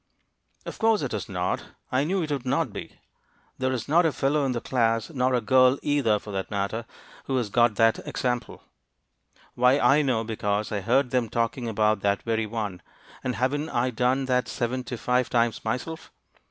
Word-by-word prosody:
"Of - - -7
course 220 -5 +3
it 130 - -3
is 105 -3 -4
not. 90 -2 -2 0.3
I 130 +3 +2
knew 185 +2 0
it 155 - -4
would 140 -4 -2
not 135 -1 0
be. - - -8 0.6
There 130 0 0
is 125 -4 -3
not 165 +4 +4
a 160 - +2
fellow 145 +1 +1
in 135 - 0
the 120 - -2
class, 115 0 0
nor 130 -3 +1
a 120 - +1
girl, 130 +3 +4
either, 135 -8 +2
for 105 0 -9
that 95 -1 -3
matter, 105 +3 -2 0.4
who 135 - -1
has 115 -5 -2
got 120 -1 +3
that 115 +1 +3
example. 125 -1 -3 0.9
Why, 125 +2 +4
I 145 +1 +4
know, 125 -6 +1
because 105 -2 -2
I 105 -2 -1
heard 125 +5 +2
them 125 -3 +1
talking 115 +2 -1
about 110 -1 +2
that 100 0 0
very 110 -1 -1
one; 105 -5 -4 0.4
and 125 -2 -2
haven't 145 +5 -1
I 125 +2 0
done 125 +3 +1
that 125 -1 +1
seventy 125 +1 -3
five 125 +2 +1
times 115 -2 +1
myself? 125 +8 -4
125 Hz, 190 wpm, -26 LUFS, 110-130 Hz, 0.9 s, not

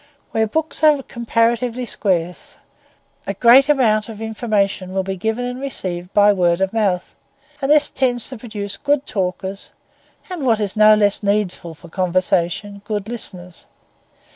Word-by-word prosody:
Where 220 0 +1
books 315 +7 -1
are 295 -3 +5
comparatively 235 0 -1
scarce, 180 -6 -2 0.7
a - - -2
greater 265 +5 +6
amount 220 -5 +1
of 215 -2 -9
information 210 -4 -1
will 190 - +1
be 190 0 -4
given 220 +6 -2
and 250 +1 -5
received 180 -9 -4
by 205 0 +5
word 175 -2 +1
of 190 +1 -1
mouth; 195 -5 -1 0.5
and 270 - -1
this 300 0 +4
tends 245 -3 0
to 260 - -7
produce 210 -4 -5
good 285 -1 0
talkers, 190 0 -4 0.6
and, 350 -6 -5
what 230 -4 +2
is 205 -1 -2
no 215 0 +7
less 205 -1 +2
needful 200 -5 -1
for 170 - -15
conversation, 185 +2 -1
good 205 -1 -4
listeners. 180 -7 -7
215 Hz, 150 wpm, -19 LUFS, 190-240 Hz, 0.7 s, no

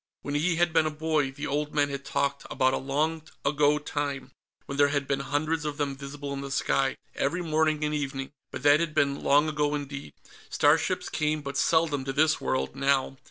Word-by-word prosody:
When 145 - -4
he 165 +4 +1
had 175 -1 +2
been 155 - +4
a - - +1
boy, 155 -2 0
the 140 +3 -6
old 150 +1 -2
men 145 -1 +3
had 140 -1 -5
talked 140 0 -1
about 130 0 +2
a - - +1
long 155 +4 -1 0.2
ago 150 +1 +3
time 145 -3 -4 0.3
when 140 0 -5
there 145 - +6
had 145 -1 -1
been 140 -1 0
hundreds 150 +4 -1
of 150 -1 -3
them 140 -2 -1
visible 140 +1 -6
in 140 - -4
the 140 - -6
sky, 135 0 +1 0.2
every 175 +6 -1
morning 155 -1 +1
and 150 0 0
evening. 135 -2 -3 0.2
But - - -7
that 145 +1 +6
had 165 -2 -2
been 140 0 +1
long 145 +2 +4
ago 150 -1 0
indeed. 140 - -6 0.4
Starships - - +2
came 150 0 -1
but 140 -1 -5
seldom 155 -2 +2
to 135 - -2
this 155 +2 +3
world, 65 - -1
now. 135 -1 +1
145 Hz, 205 wpm, -27 LUFS, 140-150 Hz, 0.4 s, there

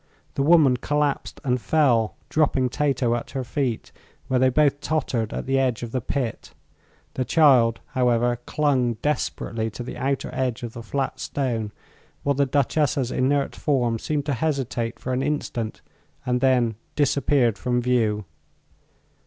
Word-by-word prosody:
The - - -1
woman 145 -4 +5
collapsed 145 +2 -1
and 125 -2 0
fell, 120 -9 +2
dropping 135 -5 +1
Tato 130 -3 +1
at 120 - -3
her 130 - -1
feet, 125 -2 -2 0.4
where 130 -1 +1
they 130 0 +4
both 145 +1 +2
tottered 130 -8 -1
at - - -4
the 135 0 +1
edge 125 -3 0
of 115 - -5
the 130 - -1
pit. 125 -2 -4 0.6
The 130 - -1
child, 125 -6 +4
however, 120 -2 +1
clung 130 -6 +1
desperately 115 -6 -1
to 115 +3 -7
the 125 - -7
outer 135 +2 -1
edge 125 -2 -2
of 115 -1 -5
the 115 - -7
flat 130 +3 -3
stone, 120 -8 -2 0.5
while 140 - +2
the 140 0 +1
Duchessa's 140 -1 +1
inert 140 +2 +1
form 120 -6 0
seemed 145 +2 -2
to 145 - 0
hesitate 125 -4 -2
for 130 - -4
an 125 - 0
instant 135 -6 -3 0.4
and 125 0 0
then 125 -5 +2 0.2
disappeared 140 -5 +2
from 125 -1 0
view. 115 -4 +1
130 Hz, 155 wpm, -24 LUFS, 120-140 Hz, 0.6 s, woman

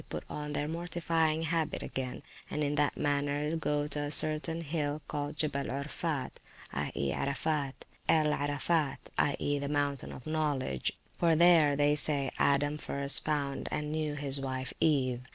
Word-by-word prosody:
e.} - - -19
put - - -5
on 150 0 -4
their 145 +1 -1
mortifying 165 -1 0
habit 165 -1 -1
again, 130 +1 -5 0.3
and 150 - -1
in 145 0 0
that 145 -1 +1
manner 145 +2 0
go 150 -2 0
to 150 0 -4
a 145 0 -2
certain 155 +2 +2
hill 150 -2 -2
called 145 0 -3
Gibbel 145 -2 -1
el 135 +3 -2
Orphat 150 -1 -3 1.8
(El 155 -2 +4
Arafat), 145 +1 -1
i.e. 145 0 +1
the 140 0 -3
Mountain 145 -2 -1
of 125 - -10
Knowledge; 150 - -1 0.3
for 170 -1 +4
[p.374] - - +1
there, 165 -4 +6
they 145 +1 +3
say, 145 -2 +5
Adam 145 +2 +2
first 140 -1 +2
found 145 -3 -2
and 150 0 -2
knew 155 -1 -1
his 140 -1 +1
wife 130 -1 -4
Eve. 130 -6 +2
145 Hz, 155 wpm, -31 LUFS, 140-155 Hz, 1.8 s, there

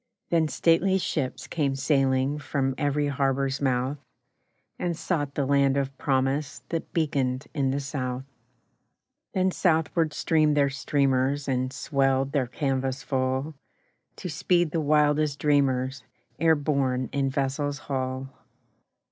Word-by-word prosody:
Then 165 -2 +3
stately 170 +5 +3
ships 150 -7 -2
came 140 -4 -1
sailing 135 0 +1
From 135 -2 -1
every 145 0 0
harbour's 135 0 0
mouth, 130 +1 0 0.8
And 175 -2 -1
sought 145 -7 -2
the 140 - 0
land 140 0 +3
of 135 -1 -1
promise 135 +1 0
That 165 -1 -3
beaconed 140 -5 0
in 140 -3 +1
the 135 +2 0
South; 130 -2 -3 1.1
Then 185 0 +2
southward 160 -3 +1
streamed 155 -2 +2
their 140 -1 +3
streamers 140 0 +1
And 130 -1 0
swelled 135 -1 +1
their 140 -4 0
canvas 135 0 -2
full 130 +3 -1 0.6
To - - -6
speed 175 +1 +1
the 165 - 0
wildest 150 -1 +2
dreamers 135 -3 +1 0.4
E'er 165 -1 +5
borne 135 -4 0
in 140 -1 0
vessel's 140 +1 -1
hull. 130 -2 -3
140 Hz, 125 wpm, -26 LUFS, 135-150 Hz, 1.1 s, E'er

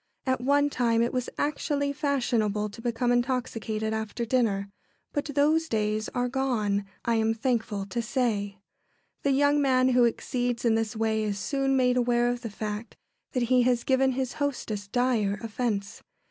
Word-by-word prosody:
At 260 -1 0
one 285 +2 +3
time 235 -3 +2
it 235 - -1
was 250 -1 -1
actually 285 -1 -1
fashionable 235 -8 0
to 220 +3 -11
become 240 +1 0
intoxicated 240 -3 -1
after 220 +2 -3
dinner, 215 -5 0 0.4
but 290 - -1
those 305 +3 +2
days 215 0 0
are 245 0 +1
gone, 230 -6 0 0.2
I 235 -1 +2
am 225 0 +1
thankful 225 -4 -1
to 220 +5 -3
say. 215 -5 -1 0.6
The 280 - +1
young 285 +2 +3
man 260 -2 +3
who 250 -1 +5
exceeds 245 +1 -1
in 230 - +4
this 225 0 -1
way 220 0 0
is 210 -2 -1
soon 270 +4 0
made 250 -1 +3
aware 240 0 +2
of 245 0 -2
the 230 - -5
fact 210 +2 -5 0.4
that 250 -3 +1
he 250 - +6
has 245 -1 +2
given 265 0 +2
his 260 -1 -2
hostess 220 -8 -2
dire 225 -3 +1
offence. 215 -3 -3
240 Hz, 165 wpm, -27 LUFS, 220-260 Hz, 0.6 s, he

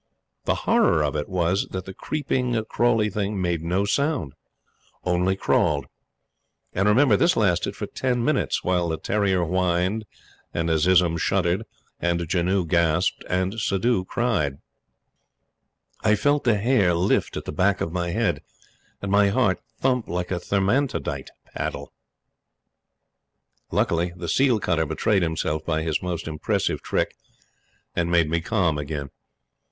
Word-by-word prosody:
The - - +2
horror 75 - +3
of 75 0 -1
it 75 +4 -3
was 90 +1 0
that 95 -1 -5
the 95 - -8
creeping, 125 -4 -1
crawly 115 -3 +2
thing 100 0 -2
made 85 -3 0
no 90 +4 0
sound 140 - 0 0.7
only 90 +1 +1
crawled! 75 -7 +1 0.9
And, 95 +2 +1
remember, 120 +1 +5
this 170 - +3
lasted 90 -5 +1
for - - -4
ten 125 -2 -1
minutes, 155 - 0
while 90 -2 +1
the 80 - -1
terrier 95 +1 +1
whined, 90 +4 0 0.5
and 85 -1 0
Azizun 85 +1 +3
shuddered, 95 +2 +1 0.3
and 85 0 0
Janoo 90 +2 +1
gasped, 85 +1 +1
and 95 +4 -1
Suddhoo 100 0 +1
cried. 105 - 0 1.5
I 105 -1 +4
felt 145 +5 +1
the 115 -4 +4
hair 100 -5 +3
lift 90 +4 +1
at - - -6
the - - -4
back 95 +5 +1
of 80 - -2
my 85 -1 -1
head, 85 - 0 0.6
and 100 - -2
my 100 0 +5
heart 100 -4 +2 0.2
thump 125 -3 +1
like 90 +1 -3
a 90 - 0
thermantidote 95 - -1 0.2
paddle. - - -4 1.8
Luckily, 85 +1 0
the 85 -1 -6
seal 130 +2 +3
cutter 80 -3 0
betrayed 105 +5 +1
himself 80 -2 -1
by 80 -1 -1
his 80 -2 -1
most 90 -3 -4
impressive 75 -1 -1
trick - - -1 0.8
and 85 -1 0
made 85 -3 +2
me 85 0 +1
calm 85 -6 0
again. 70 -1 -5
90 Hz, 140 wpm, -24 LUFS, 85-105 Hz, 1.8 s, remember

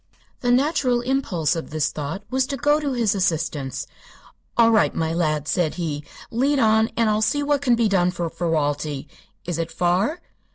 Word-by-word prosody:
The 245 - -1
natural 255 -1 +2
impulse 230 - 0
of 165 - -5
this 155 -1 -1
thought 155 +7 -5
was 260 0 +1
to 280 - -3
go 295 +4 +3
to 285 -3 -2
his 230 -5 +1
assistance. 155 - -1 0.7
"All 230 -1 +6
right, 220 -2 +3
my 160 0 -1
lad," 155 -3 0
said 170 -2 0
he. 155 -4 -3 0.3
"Lead 275 +5 +1
on, 220 -2 +3
and 230 -1 +3
I'll 215 0 +1
see 290 +7 +1
what 285 -1 +1
can 250 -4 +3
be 230 -1 +2
done 180 -3 +2
for 175 -1 -3
Ferralti. 150 -4 -1 0.4
Is 170 -2 -3
it 165 - -3
far?" 185 - +1
195 Hz, 180 wpm, -23 LUFS, 160-245 Hz, 0.7 s, All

